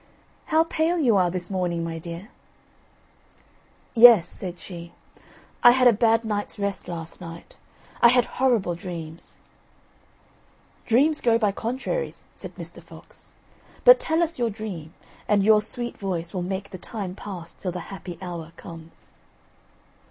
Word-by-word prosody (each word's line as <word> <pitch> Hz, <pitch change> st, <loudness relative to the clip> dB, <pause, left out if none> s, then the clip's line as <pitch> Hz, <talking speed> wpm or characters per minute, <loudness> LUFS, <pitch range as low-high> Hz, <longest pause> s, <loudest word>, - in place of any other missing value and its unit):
"How 320 Hz, 0 st, +3 dB
pale 330 Hz, +1 st, 0 dB
you 250 Hz, -9 st, +3 dB
are 180 Hz, -2 st, +3 dB
this 180 Hz, +1 st, -4 dB
morning, 175 Hz, -3 st, -1 dB
my 165 Hz, 0 st, -4 dB
dear." 170 Hz, +5 st, -8 dB, 1.6 s
"Yes," 225 Hz, -7 st, +8 dB
said 180 Hz, -1 st, -7 dB
she, 170 Hz, -2 st, -9 dB, 0.7 s
"I 240 Hz, -, +8 dB
had 255 Hz, 0 st, +5 dB
a 240 Hz, -, +7 dB
bad 225 Hz, +1 st, +2 dB
night's 205 Hz, -1 st, -3 dB
rest 200 Hz, -2 st, -3 dB
last 165 Hz, -1 st, -7 dB
night. 170 Hz, -1 st, -10 dB, 0.5 s
I -, -, +9 dB
had 245 Hz, 0 st, +4 dB, 0.2 s
horrible 235 Hz, -9 st, +2 dB
dreams." 170 Hz, -2 st, -8 dB, 1.5 s
"Dreams 290 Hz, +7 st, +3 dB
go 230 Hz, -1 st, +3 dB
by 210 Hz, -3 st, +1 dB
contraries," 260 Hz, -, -4 dB
said -, -, -10 dB
Mr. -, -, -8 dB
Fox; -, -, -16 dB, 0.5 s
"but -, -, +9 dB
tell 325 Hz, +2 st, +1 dB
us 335 Hz, -4 st, -4 dB
your 235 Hz, -1 st, +1 dB
dream, 200 Hz, -7 st, -7 dB, 0.4 s
and 205 Hz, -2 st, +3 dB
your 215 Hz, +1 st, +5 dB
sweet 240 Hz, +3 st, -4 dB
voice 175 Hz, -4 st, -3 dB
will 185 Hz, -, -2 dB
make 190 Hz, +2 st, -4 dB
the 185 Hz, -, -8 dB
time 195 Hz, -2 st, -5 dB
pass 180 Hz, -4 st, -8 dB
till 180 Hz, -, -5 dB
the 180 Hz, +2 st, -7 dB
happy 180 Hz, -3 st, -8 dB
hour 170 Hz, -2 st, -7 dB
comes." 165 Hz, -1 st, -12 dB
200 Hz, 145 wpm, -24 LUFS, 175-235 Hz, 1.6 s, I